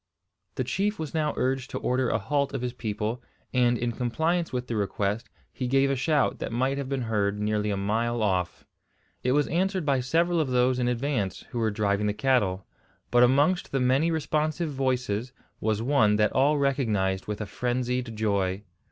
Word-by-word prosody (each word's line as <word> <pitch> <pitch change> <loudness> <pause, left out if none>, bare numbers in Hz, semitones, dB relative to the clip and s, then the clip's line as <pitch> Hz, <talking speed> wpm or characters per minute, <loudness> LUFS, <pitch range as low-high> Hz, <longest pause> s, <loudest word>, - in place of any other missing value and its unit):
The - - -1
chief 205 +2 -1
was 155 -3 -5
now 155 -2 0
urged 130 +1 0
to - - -4
order 125 -1 0
a - - +2
halt 140 +7 -1
of 130 - -3
his 125 -1 -2
people; 110 0 -3 0.3
and, 120 -1 +3
in 120 0 -1
compliance 160 +9 -1
with 125 -1 -2
the 120 - -4
request, 100 +1 -1 0.2
he 125 - -3
gave 135 +2 +3
a - - +1
shout 145 +1 +1
that - - -4
might 130 +4 0
have 135 -2 -4
been 135 -2 -1
heard 105 -2 0
nearly 105 0 0
a 100 - -1
mile 115 +4 0
off. 90 -3 -1 0.6
It 125 - +1
was 145 0 +3
answered 185 +1 0
by 140 -2 +2
several 165 +7 +1
of 155 - +1
those 125 0 +2
in 120 - +1
advance, 120 -5 -1
who 120 - -3
were 110 -1 +2
driving 105 0 0
the 105 - +1
cattle; 105 -8 +1 0.5
but 120 - +5
amongst 145 +9 +3
the 135 - 0
many 130 +6 +3
responsive 155 0 -1
voices 125 -3 -1 0.3
was 110 0 0
one 115 -6 +3
that 105 0 +2
all 145 +3 +3
recognised 110 -9 0
with 105 0 -3
a 105 - -3
frenzied 125 +1 -2
joy. 100 -2 0
125 Hz, 190 wpm, -27 LUFS, 105-140 Hz, 0.6 s, but